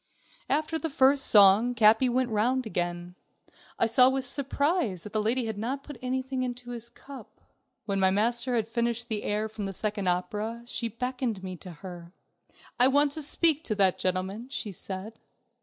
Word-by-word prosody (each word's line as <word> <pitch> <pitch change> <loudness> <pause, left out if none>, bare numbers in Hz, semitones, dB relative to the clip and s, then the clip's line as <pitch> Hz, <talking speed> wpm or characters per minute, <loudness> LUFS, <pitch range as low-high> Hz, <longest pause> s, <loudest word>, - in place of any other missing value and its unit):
After 310 +3 0
the 325 - -3
first 275 0 +3
song, 210 +4 +6
Capi 225 +3 +5
went 250 0 0
the - - -5
round 250 +4 +1
again. 175 -3 -3 0.6
I - - +3
saw 250 +3 +5
with 265 0 -2
surprise 280 - -1
that 210 - -9
the 215 - +1
lady 235 +3 0
had 220 -2 -4
not 265 +5 -3
put 290 -6 -10
anything 260 +1 -2
into 245 -1 -5
his 235 -1 -6
cup. 255 -4 -13 0.5
When 200 -2 -1
my 190 0 +4
master 235 +5 +1
had 220 -2 0
finished 235 +1 -2
the 215 -2 0
air 210 +1 -1
from 215 -2 -6
the 195 - -5
second 205 0 -2
opera, 210 +6 -2
she 240 -1 -2
beckoned 245 -3 -3
me 185 -1 -5
to 180 - -10
her. 175 -1 -9 0.7
"I 250 - +7
want 285 +2 +3
to 310 - -5
speak 315 +1 +2
to 215 - -1
that 195 -3 +2
gentleman," 190 +5 -2
she 240 -6 -4
said. 195 +4 -7
230 Hz, 185 wpm, -28 LUFS, 205-260 Hz, 0.7 s, I